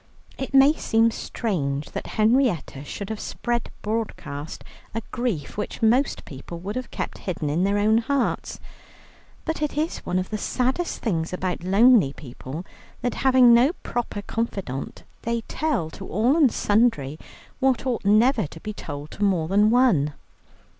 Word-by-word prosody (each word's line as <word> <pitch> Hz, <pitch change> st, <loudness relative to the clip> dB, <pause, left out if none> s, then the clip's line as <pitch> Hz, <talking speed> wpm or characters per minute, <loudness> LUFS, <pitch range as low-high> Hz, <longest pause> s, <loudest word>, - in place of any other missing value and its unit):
It 265 Hz, -, -4 dB
may 275 Hz, +2 st, +7 dB
seem 225 Hz, -6 st, +2 dB
strange 150 Hz, -, -3 dB
that -, -, -5 dB
Henrietta 215 Hz, -, +2 dB
should 200 Hz, +7 st, -6 dB
have 220 Hz, -, -4 dB
spread 240 Hz, -1 st, -2 dB
broadcast 205 Hz, -9 st, -4 dB, 0.3 s
a 225 Hz, -, -2 dB
grief 235 Hz, -, -2 dB
which 210 Hz, -, -4 dB
most 245 Hz, +6 st, +2 dB
people 145 Hz, +4 st, -8 dB
would 205 Hz, +8 st, -5 dB
keep -, -, -5 dB
hidden 160 Hz, -5 st, -3 dB
in 165 Hz, +5 st, +1 dB
their 200 Hz, +1 st, +2 dB
own 215 Hz, +2 st, +4 dB
hearts. 270 Hz, +3 st, -1 dB, 0.9 s
But 320 Hz, -1 st, -2 dB
it 295 Hz, -1 st, -2 dB
is 315 Hz, +3 st, -1 dB
one 180 Hz, -, -2 dB
of 185 Hz, +2 st, -2 dB
the 215 Hz, -, -2 dB
saddest 260 Hz, +11 st, -1 dB
things 170 Hz, -6 st, -1 dB
about 180 Hz, -2 st, -2 dB
lonely 200 Hz, -, +5 dB
people, 140 Hz, +5 st, -8 dB, 0.4 s
that, 245 Hz, -, 0 dB
having 255 Hz, -2 st, +6 dB
no 250 Hz, +7 st, +5 dB
proper 230 Hz, -4 st, -3 dB
confidant, 195 Hz, -, -4 dB, 0.2 s
they 235 Hz, 0 st, -1 dB
tell 245 Hz, -, -2 dB
to -, -, -9 dB
all 230 Hz, -, +2 dB
and 295 Hz, -7 st, +5 dB
sundry 205 Hz, -, +1 dB, 0.4 s
what 265 Hz, -1 st, +2 dB
ought 250 Hz, -3 st, -1 dB
never 215 Hz, -, +4 dB
to 165 Hz, -, -12 dB
be 210 Hz, +5 st, -6 dB
told 145 Hz, -5 st, -7 dB
to 205 Hz, -, -4 dB
more 180 Hz, -6 st, +2 dB
than 205 Hz, +4 st, +4 dB
one. 220 Hz, -, +3 dB
215 Hz, 155 wpm, -24 LUFS, 170-245 Hz, 0.9 s, may